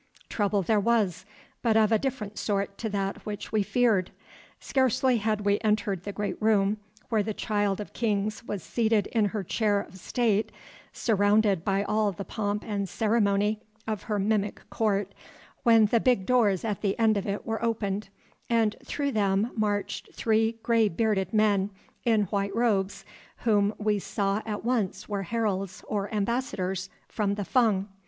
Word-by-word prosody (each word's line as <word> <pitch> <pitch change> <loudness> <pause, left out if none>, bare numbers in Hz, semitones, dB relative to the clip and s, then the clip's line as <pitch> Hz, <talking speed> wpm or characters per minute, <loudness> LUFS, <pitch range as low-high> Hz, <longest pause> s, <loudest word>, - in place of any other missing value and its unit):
Trouble 205 -2 +1
there 215 +4 +2
was, 200 -4 +1 0.4
but 225 -2 +3
of 220 0 +4
a 220 - +4
different 215 -6 -3
sort 200 -1 -1
to 225 - -2
that 195 -1 -2
which 210 -1 -6
we 215 - +2
feared. 210 -3 +2 0.5
Scarcely 260 -1 +2
had 215 -1 0
we 205 0 +2
entered 210 -4 0
the 205 - -3
great 205 +1 -4
room 210 -1 +3 0.3
where 220 -2 +2
the 210 0 -3
Child 205 -2 0
of 210 - -7
Kings 210 -2 -1
was 205 -5 -5
seated 220 -3 +1
in 220 -3 +2
her 205 0 -2
chair 205 +2 +1
of 190 -1 -9
state 220 0 0 0.4
surrounded 205 -4 +2
by 195 0 +1
all 210 0 +1
the 195 +1 -7
pomp 210 -1 -2
and 200 -3 -2
ceremony 210 -1 +1 0.3
of 215 -3 -2
her 210 -2 -2
mimic 205 0 -1
court, 200 -3 0 0.5
when 225 -2 +6
the 230 +3 +3
big 240 -6 +2
doors 220 -6 +2
at 210 -3 -2
the 200 -2 0
end 220 -2 +3
of 200 - -2
it 200 +1 -3
were 225 0 -3
opened, 210 -3 -1 0.4
and 225 -2 +2
through 280 +1 -2
them 205 +1 +1
marched 205 -2 -2
three 225 0 +2
gray 230 -2 +3
bearded 200 +1 0
men 205 -3 +3 0.4
in 220 -3 +4
white 200 +1 -2
robes 205 -5 0 0.4
whom 205 -3 +3
we 210 -1 +1
saw 195 +1 -1
at 210 0 -4
once 235 -6 -1
were 205 -2 -2
heralds 195 -2 -2
or 205 -1 -2
ambassadors 195 -4 -2 0.2
from 200 -2 -1
the 205 -1 -3
Fung. 210 -6 +2
210 Hz, 165 wpm, -27 LUFS, 200-225 Hz, 0.5 s, when